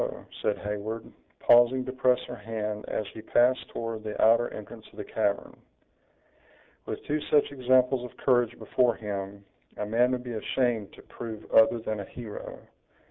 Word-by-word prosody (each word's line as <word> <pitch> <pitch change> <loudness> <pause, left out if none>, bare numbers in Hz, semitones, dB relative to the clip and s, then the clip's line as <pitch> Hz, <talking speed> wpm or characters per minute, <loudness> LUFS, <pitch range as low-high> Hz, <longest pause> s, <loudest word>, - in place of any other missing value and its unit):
said 105 - +1
Heyward, 105 +2 -4 0.4
pausing 120 +2 +5
to 130 - -4
press 130 -1 +3
her 125 - -6
hand 105 -1 -4
as 110 - -2
he 110 - -8
passed 125 +3 +2
toward 115 -1 -4
the 105 -1 -5
outer 115 +2 +4
entrance 110 +1 -9
of - - -19
the - - -4
cavern. - - -1 1.3
"With - - -5
two 150 +1 -1
such 145 -1 +4
examples 130 -1 +3
of - - -24
courage 120 -2 +2
before 125 -2 +2
him, 100 -2 -5 0.3
a 105 - -2
man 120 +4 +2
would 125 -1 -2
be 120 -1 -5
ashamed 115 -2 0
to - - -14
prove 110 -2 -8
other 110 +1 +6
than 110 -1 -3
a 100 - -5
hero." 110 0 -8
115 Hz, 165 wpm, -28 LUFS, 105-125 Hz, 1.3 s, other